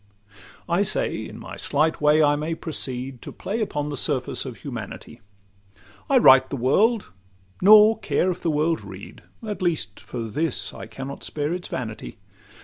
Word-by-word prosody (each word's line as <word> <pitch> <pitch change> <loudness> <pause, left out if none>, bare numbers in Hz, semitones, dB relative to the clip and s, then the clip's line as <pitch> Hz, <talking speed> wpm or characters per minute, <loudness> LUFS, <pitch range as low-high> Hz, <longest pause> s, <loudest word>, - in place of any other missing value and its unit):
I - - +1
say, - - 0
in - - -10
my - - -9
slight 155 +3 0
way 150 +1 +5
I 145 0 +4
may 155 +3 -3
proceed 130 -5 -5
To - - -8
play 220 +4 -4
upon 150 -8 -2
the 145 - -4
surface 135 -1 -1
of 125 -3 -7
humanity. 120 -2 -8 0.9
I 275 - +5
write 130 - +7
the 140 - -3
world, 195 - +2 0.5
nor 215 +3 +7
care 185 - +1
if 180 - -7
the 170 - 0
world 155 0 +1
read, 95 +1 -11 0.3
At 210 -2 -4
least 160 - -1
for 120 -2 -6
this 150 +5 0
I - - -9
cannot 135 +1 -8
spare 150 +2 -2
its 180 0 -5
vanity. 115 -3 -6
150 Hz, 165 wpm, -24 LUFS, 130-170 Hz, 0.9 s, write